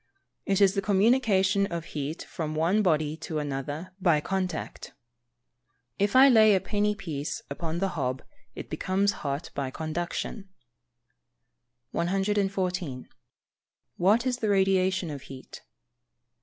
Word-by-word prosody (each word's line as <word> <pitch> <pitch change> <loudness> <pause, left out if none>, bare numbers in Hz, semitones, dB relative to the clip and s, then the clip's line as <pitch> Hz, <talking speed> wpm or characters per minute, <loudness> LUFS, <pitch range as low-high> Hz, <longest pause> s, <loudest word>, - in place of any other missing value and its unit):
_ - - -47 0.4
It 195 0 +2
is 195 -1 +5
the 200 - 0
communication 200 -1 +3
of 170 -2 -5
heat 150 +2 -4
from 155 -2 -5
one 170 +7 +2
body 155 -5 +1
to 160 0 -5
another 145 +5 -4
by 170 -5 +4
contact. 185 +1 -4 1.1
If 205 +4 +1
I 265 +1 +9
lay 220 -5 +6
a - - +3
penny 210 +2 0
piece 155 -8 -5
upon 160 +3 -3
the 195 +2 0
hob, 135 -6 -3 0.3
it - - -7
becomes 195 +2 0
hot 140 +2 -3
by 140 -2 -3
conduction. 175 - -4 1.4
114. 185 -5 -1 0.9
_What 210 +7 +3
is 250 -1 0
the 220 -3 -1
Radiation 190 -3 +2
of 140 -2 -6
heat? 130 -1 -11
185 Hz, 130 wpm, -27 LUFS, 155-200 Hz, 1.4 s, I